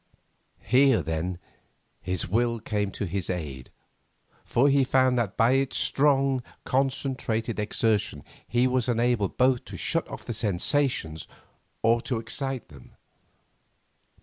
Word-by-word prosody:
Here, 130 - +4
then, 80 +4 -2 0.6
his 90 -1 -2
will 115 +4 +1
came 105 -1 -2
to - - -3
his 95 0 -3
aid, 75 -8 -5 0.7
for 130 +4 +2
he 140 -1 +4
found 130 0 +3
that 105 -5 -2
by 115 +2 +4
its 135 0 +1
strong, 135 -2 +2 0.2
concentrated 130 -4 -1
exertion 105 -7 0 0.2
he 120 +2 +2
was 130 -1 +1
enabled 120 -4 +1
both 130 -1 +3
to - - -8
shut - - -1
off - - -9
the 120 - -3
sensations 105 - 0 0.6
or 115 +1 +3
to 125 - -2
excite 130 +3 -3
them. 70 -4 -16
115 Hz, 125 wpm, -26 LUFS, 100-130 Hz, 0.7 s, Here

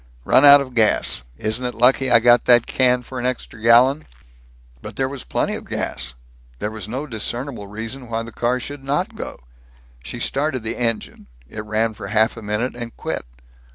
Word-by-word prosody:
"Run 130 - +5
out 145 0 +9
of 130 -2 -7
gas. 110 - +2 0.2
Isn't 110 +4 -1
it 125 -1 -3
lucky 130 +3 +3
I 120 - +7
got 120 +1 +4
that 120 -1 +5
can 125 -1 +2
for 130 +1 -7
an 120 - -4
extra 125 -3 -5
gallon?" 125 +6 +4 0.7
But - - -9
there 130 - 0
was 135 -1 -6
plenty - - -1
of - - -6
gas. - - -2 0.4
There 105 - -4
was 110 -3 -7
no 130 +6 -4
discernible 120 -2 -5
reason 115 +5 -6
why 115 0 -2
the 115 - -9
car 120 +3 -1
should 145 +2 -8
not 140 +2 -1
go. - - -8 0.6
She - - -7
started 135 -3 -1
the 110 +1 -3
engine. 115 -3 -3 0.2
It 105 - -7
ran 110 +1 0
for - - -8
half 110 +1 +2
a 115 - -9
minute 105 +4 -2
and 120 -1 -8
quit. - - -4
120 Hz, 190 wpm, -21 LUFS, 110-130 Hz, 0.7 s, out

